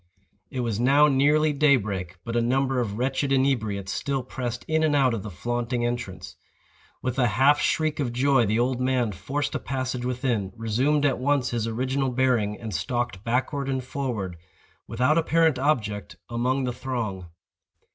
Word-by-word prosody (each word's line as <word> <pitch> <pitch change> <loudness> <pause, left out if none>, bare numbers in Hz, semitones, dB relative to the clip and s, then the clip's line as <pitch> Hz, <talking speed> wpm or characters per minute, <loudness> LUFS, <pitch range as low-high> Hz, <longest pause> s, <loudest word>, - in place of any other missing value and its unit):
It 130 - -3
was 115 -3 -2
now 140 +5 +5
nearly 150 +2 +3
day 145 0 +5
break; 95 -6 -3
but 115 - -4
a 120 - +3
number 130 +2 +1
of 105 -4 -2
wretched 135 +3 0
inebriates 110 -8 +1
still 135 +3 -2
pressed 120 -1 -5
in 160 0 +1
and 155 -2 +2
out 130 -4 +3
of 110 - -2
the 105 - -7
flaunting 120 +5 -2
entrance. 120 -6 -5 0.7
With 130 +1 -2
a 125 - +4
half 135 +7 +4
shriek 155 0 0
of 130 -5 -1
joy 130 -1 +3
the 110 +2 +1
old 125 +1 0
man 125 -3 +1
forced 135 +11 -3
a - - -1
passage 130 -2 -3
within, 125 -6 -1
resumed 130 +7 +1
at 135 -4 +1
once 135 -1 +1
his 115 -2 -1
original 130 +4 -1
bearing, 120 -5 +1
and 110 -3 -6
stalked 110 +2 -2
backward 130 +4 -1
and 130 -1 -1
forward, 120 -9 -4 0.5
without 130 +8 +2
apparent 160 -3 +2
object, 110 -8 -1 0.2
among 125 +3 0
the 125 -1 -1
throng. 115 -9 -4
125 Hz, 170 wpm, -25 LUFS, 115-135 Hz, 0.7 s, now